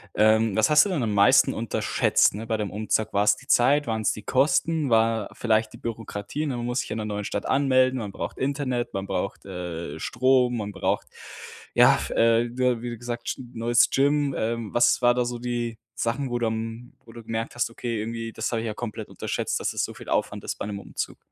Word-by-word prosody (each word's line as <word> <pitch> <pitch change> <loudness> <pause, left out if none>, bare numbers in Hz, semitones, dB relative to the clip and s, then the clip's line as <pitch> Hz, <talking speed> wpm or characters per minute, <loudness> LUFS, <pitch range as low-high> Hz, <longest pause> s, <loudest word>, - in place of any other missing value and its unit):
Ähm, 110 0 +4
was 110 -1 +3
hast 150 +4 +7
du - - -2
denn 165 -9 -1
am 110 -2 -1
meisten 105 +7 +5
unterschätzt, 115 -1 +2
ne, 110 +2 -6
bei 110 -1 0
dem 105 -3 -3
Umzug? 110 +1 -1
War's 100 +1 +4
die 135 - -16
Zeit, 140 +3 +4
waren's 110 -1 0
die 105 - -7
Kosten? 150 +4 +2
War 115 -2 +2
vielleicht 110 -1 +1
die - - -10
Bürokratie, 115 +5 -5
ne, 130 -4 -2
man 120 - -4
muss 120 +1 -1
sich - - -4
in 110 - -2
der 110 - -3
neuen 105 -1 -3
Stadt 100 - -3
anmelden. 130 -1 +3
Man 105 -3 -5
braucht - - -6
Internet, 130 -3 -2
man 95 0 -3
braucht, 95 +1 -3
äh, 85 -5 -6
Strom, 125 +3 +2
man 105 -2 -4
braucht, - - -1 0.7
ja, - - +6
f - - -4
ja, - - -4
äh, 115 0 +4
ja, 125 -2 +1
wie 120 -1 -5
gesagt, 120 0 -6
G 130 - -9
neues 120 +1 +3
Gym. 140 +1 +2
Ähm, 115 -1 -2
was 120 +1 +3
war 120 0 +5
da 125 0 +1
so 120 0 -4
die 120 -1 -3 0.2
Sachen, 125 +4 -1
wo 120 0 -1
du 120 - +1
am 115 +2 -5
wo - - -14
du 115 0 -11
gemerkt 115 +1 -4
hast: 120 -1 0
„Okay, 115 -1 -4
irgendwie, 115 +1 -4
das 110 - -3
habe 115 -2 -1
ich - - -5
ja 110 - -3
komplett 110 -1 -6
unterschätzt, - - -2
dass - - -2
es - - -1
so - - -4
viel - - -11
Aufwand - - -1
ist - - -3
bei - - -5
'nem 100 -1 -5
Umzug?“ - - -5
115 Hz, 230 wpm, -25 LUFS, 110-125 Hz, 0.7 s, hast